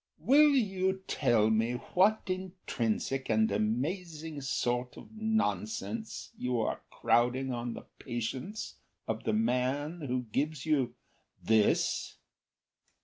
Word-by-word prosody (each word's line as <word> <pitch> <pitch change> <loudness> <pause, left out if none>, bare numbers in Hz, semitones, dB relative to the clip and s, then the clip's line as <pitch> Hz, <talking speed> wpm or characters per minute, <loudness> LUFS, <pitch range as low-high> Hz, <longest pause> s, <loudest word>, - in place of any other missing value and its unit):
"Will 275 - +6
you 190 -5 +1
tell 115 -6 +3
me 115 +2 +2
what 190 - +2
intrinsic 175 - -2
and 110 -1 +3
amazing 150 - -2
sort 125 -2 -1
of - - -11
nonsense 220 0 -2
You 125 - -1
are - - -2
crowding 125 +2 +2
on 120 -1 -3
the - - -9
patience 130 - -4 0.3
of - - -3
the - - +1
man 145 - 0
who 125 0 -1
gives 150 +3 -1
you 145 -6 +1 0.5
this? 110 -2 +2
140 Hz, 110 wpm, -31 LUFS, 120-190 Hz, 0.5 s, Will